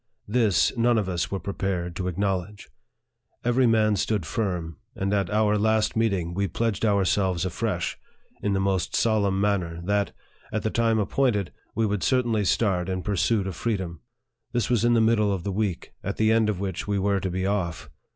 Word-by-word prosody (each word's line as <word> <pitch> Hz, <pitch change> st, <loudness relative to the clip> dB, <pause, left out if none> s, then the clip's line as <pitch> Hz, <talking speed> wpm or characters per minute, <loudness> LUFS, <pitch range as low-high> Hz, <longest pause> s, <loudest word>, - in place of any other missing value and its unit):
This, 110 Hz, -1 st, +2 dB
none 120 Hz, 0 st, +3 dB
of 105 Hz, -3 st, 0 dB
us 90 Hz, -2 st, -1 dB
were 100 Hz, -, -2 dB
prepared 90 Hz, -2 st, -3 dB
to 90 Hz, -, -2 dB
acknowledge. 95 Hz, +2 st, -2 dB, 0.8 s
Every 120 Hz, +1 st, +3 dB
man 110 Hz, -2 st, +3 dB
stood 100 Hz, -2 st, -1 dB
firm; 85 Hz, -6 st, -2 dB, 0.2 s
and 95 Hz, +1 st, -1 dB
at 100 Hz, -3 st, +1 dB
our 105 Hz, 0 st, +2 dB
last 110 Hz, +1 st, +2 dB
meeting, 100 Hz, -7 st, 0 dB
we 100 Hz, +2 st, 0 dB
pledged 110 Hz, +3 st, -2 dB
our 100 Hz, -3 st, +3 dB
selves 95 Hz, -2 st, +1 dB
afresh, 90 Hz, -1 st, -2 dB, 0.4 s
in 100 Hz, -, 0 dB
the 95 Hz, -, +1 dB
most 95 Hz, -2 st, 0 dB
solemn 100 Hz, -4 st, +2 dB
manner, 95 Hz, -5 st, 0 dB
that, 100 Hz, +2 st, 0 dB, 0.4 s
at 110 Hz, -, -2 dB
the 110 Hz, -, 0 dB
time 115 Hz, -1 st, +2 dB
appointed, 105 Hz, -2 st, +1 dB, 0.2 s
we 115 Hz, -, +2 dB
would 105 Hz, -2 st, -1 dB
certainly 120 Hz, -5 st, +1 dB
start 95 Hz, -3 st, +1 dB
in 95 Hz, -1 st, -2 dB
pursuit 105 Hz, +1 st, +1 dB
of 95 Hz, -3 st, -4 dB
freedom. 95 Hz, -7 st, -3 dB, 0.5 s
This 120 Hz, 0 st, 0 dB
was 120 Hz, -2 st, +2 dB
in 120 Hz, 0 st, +4 dB
the 115 Hz, -, +4 dB
middle 110 Hz, -2 st, +3 dB
of 95 Hz, -3 st, -2 dB
the 100 Hz, -, -2 dB
week, 100 Hz, -3 st, -2 dB
at 100 Hz, -, -3 dB
the 110 Hz, 0 st, +3 dB
end 110 Hz, -1 st, +3 dB
of 100 Hz, -4 st, -1 dB
which 95 Hz, -1 st, -3 dB
we 100 Hz, -1 st, 0 dB
were 100 Hz, 0 st, +1 dB
to 95 Hz, -1 st, -2 dB
be 95 Hz, +1 st, -2 dB
off. 95 Hz, -5 st, -2 dB
100 Hz, 190 wpm, -25 LUFS, 95-110 Hz, 0.8 s, in